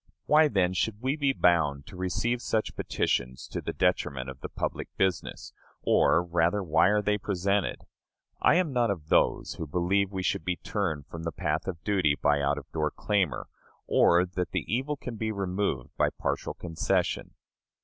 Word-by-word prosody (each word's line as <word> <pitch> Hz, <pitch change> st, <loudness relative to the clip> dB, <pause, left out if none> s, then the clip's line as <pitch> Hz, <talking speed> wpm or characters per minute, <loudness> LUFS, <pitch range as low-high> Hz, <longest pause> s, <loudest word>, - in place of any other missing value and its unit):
Why, 155 Hz, +1 st, +6 dB
then, 95 Hz, -8 st, +1 dB
should 105 Hz, +3 st, -1 dB
we 130 Hz, +4 st, 0 dB
be 140 Hz, -3 st, +2 dB
bound 80 Hz, -, +2 dB
to 100 Hz, -, -12 dB
receive 95 Hz, +7 st, -1 dB
such 110 Hz, -3 st, -1 dB
petitions 65 Hz, +1 st, -1 dB
to -, -, -4 dB
the -, -, -3 dB
detriment 65 Hz, -1 st, 0 dB
of 65 Hz, -, -14 dB
the -, -, -5 dB
public -, -, -3 dB
business; 95 Hz, -3 st, -1 dB, 0.3 s
or, 85 Hz, -, +4 dB
rather, 85 Hz, +3 st, +1 dB
why 80 Hz, 0 st, +4 dB
are 105 Hz, +1 st, +2 dB
they 105 Hz, 0 st, +1 dB
presented? 100 Hz, 0 st, -1 dB, 0.6 s
I -, -, +5 dB
am 175 Hz, -5 st, +1 dB
not 120 Hz, -2 st, +2 dB
of 80 Hz, -6 st, -4 dB
those -, -, +2 dB
who 80 Hz, -, -3 dB
believe 95 Hz, +5 st, +1 dB
we 95 Hz, -2 st, -3 dB
should 85 Hz, -, 0 dB
be 90 Hz, +1 st, -1 dB
turned 85 Hz, -8 st, -3 dB
from 80 Hz, +1 st, -8 dB
the 85 Hz, 0 st, -3 dB
path 80 Hz, -1 st, -2 dB
of 85 Hz, -4 st, -5 dB
duty 90 Hz, -8 st, +2 dB
by 75 Hz, -1 st, +2 dB
out 70 Hz, +1 st, +1 dB
of 70 Hz, -, -7 dB
door 75 Hz, -1 st, 0 dB
clamor, 100 Hz, -2 st, -1 dB, 0.4 s
or 85 Hz, +1 st, +4 dB
that 90 Hz, 0 st, -3 dB
the -, -, -1 dB
evil 135 Hz, +7 st, -1 dB
can 125 Hz, -4 st, -7 dB
be 110 Hz, 0 st, -1 dB
removed 95 Hz, -9 st, -2 dB
by -, -, +4 dB
partial -, -, -3 dB
concession. 80 Hz, -2 st, -1 dB
90 Hz, 180 wpm, -28 LUFS, 80-105 Hz, 0.6 s, Why